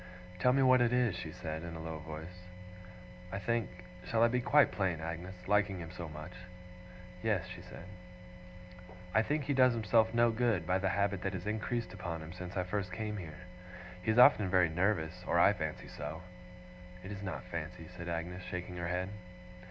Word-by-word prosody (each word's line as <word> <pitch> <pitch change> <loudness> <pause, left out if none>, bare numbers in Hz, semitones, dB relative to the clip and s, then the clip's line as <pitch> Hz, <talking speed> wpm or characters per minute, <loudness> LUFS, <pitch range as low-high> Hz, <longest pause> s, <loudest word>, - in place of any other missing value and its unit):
'Tell 125 - +5
me 135 +1 +4
what 130 -1 +6
it 120 -1 +3
is,' 125 -6 +2
she 80 -2 -5
said, 80 -1 -5
in 85 0 -6
a - - -6
low 80 -1 -5
voice. 80 +4 -9 0.8
'I 95 - -3
think 115 +1 0 0.3
shall 115 +3 +2
I 115 - +6
be 125 +1 +1
quite 140 +1 +5
plain, 95 -5 0
Agnes, 85 +3 -6
liking 105 -1 +2
him 85 -1 -7
so 85 -2 -6
much?' 75 +4 -8 0.9
'Yes,' 110 -6 +1
she - - -9
said. 85 - -11 1.3
'I 110 - +5
think 150 +6 0
he 140 +1 0
does 130 -2 +5
himself 110 0 +3
no 120 0 +4
good 115 -6 +1
by 90 +2 +2
the 95 0 +1
habit 100 0 0
that 95 - -2
has 90 0 -5
increased 110 +2 -2
upon 90 -5 -5
him 80 +2 -8
since 90 +1 -7
I 90 - +1
first 95 0 -2
came 105 +2 -3
here. 85 -3 -8 0.6
He 100 - -3
is 110 - +3
often 105 -5 +7
very 90 -2 +4
nervous 90 0 0
or - - +2
I 100 +4 +7
fancy 80 -5 -4
so.' 75 +4 -6 0.8
'It 95 - -7
is 100 -1 -6
not 95 -1 -4
fancy,' 85 -1 -6
said 85 -1 -6
Agnes, 85 +2 -3
shaking 90 0 -5
her 85 -1 -2
head. 90 +2 -1
90 Hz, 195 wpm, -33 LUFS, 85-110 Hz, 1.3 s, often